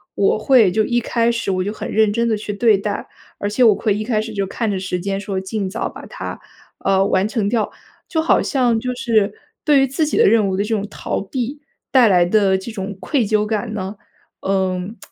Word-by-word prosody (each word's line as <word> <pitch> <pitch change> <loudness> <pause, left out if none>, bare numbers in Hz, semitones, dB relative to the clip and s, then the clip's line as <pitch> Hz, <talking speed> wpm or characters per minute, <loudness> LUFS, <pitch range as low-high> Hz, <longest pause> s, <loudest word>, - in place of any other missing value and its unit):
我 200 +2 +2
会 225 -5 +5
就 220 +2 +2
一 240 +2 +1
开 235 0 +1
始 230 -4 -2
我 185 -1 0
就 205 - -2
很 - - -6
认 220 -1 +3
真 235 +2 0
地 220 - +2
去 210 0 -5
对 215 +1 +4
待， 205 0 -3 0.3
而 205 - -3
且 215 +5 +1
我 220 -4 +6
会 210 -1 0
一 215 - -2
开 215 -1 0
始 220 0 -4
就 200 -2 -1
看 225 +2 -2
着 190 - -2
时 185 -1 -3
间 195 +1 -2
说 200 -2 -3
尽 190 0 -3
早 225 - -3
把 - - -10
它 - - -7 0.4
呃， 195 0 +2
完 190 0 +2
成 215 -2 -1
掉。 220 -1 0 0.4
就 320 -2 +1
好 320 - +3
像 245 -5 +1
就 250 +1 -3
是， 230 -5 +1 0.3
对 295 -3 +5
于 270 - +3
自 290 +4 0
己 300 - -1
的 - - +5
任 215 -1 +4
务 185 - -1
的 200 - +1
这 210 - -7
种 205 -1 -2
逃 - - -3
避， 255 +7 -4 0.3
带 255 -4 +5
来 180 -2 +4
的 190 0 +3
这 190 +5 -7
种 200 -1 -5
愧 270 -7 0
疚 210 0 +2
感 215 0 -2
呢， 195 0 -4 0.5
嗯， 190 +2 -1
215 Hz, 250 characters per minute, -19 LUFS, 195-235 Hz, 0.5 s, 我